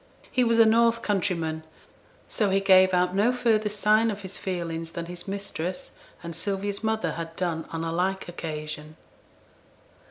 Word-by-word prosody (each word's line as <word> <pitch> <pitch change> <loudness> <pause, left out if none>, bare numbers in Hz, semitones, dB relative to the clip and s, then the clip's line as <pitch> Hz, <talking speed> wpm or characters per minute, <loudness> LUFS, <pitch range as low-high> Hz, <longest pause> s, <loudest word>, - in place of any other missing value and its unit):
He 255 - +3
was 230 -1 +3
a 225 - +8
north 230 +1 +4
countryman, 170 -6 -1 0.6
so 210 -3 0
he 195 +1 +3
gave 190 -1 +6
out 180 0 +2
no 205 +5 +3
further 225 -4 +2
sign 215 +2 +3
of 205 -1 -5
his 190 0 -7
feelings 165 -3 -4
than 170 - -4
his 175 +2 -7
mistress 185 -3 -4 0.3
and 170 -1 -6
Sylvia's 200 +3 -2
mother 220 -6 0
had 165 +1 -6
done 170 -3 -2
on 165 0 -3
a 165 - -2
like 190 +3 -1
occasion. 155 -2 -6
190 Hz, 160 wpm, -26 LUFS, 165-210 Hz, 0.6 s, a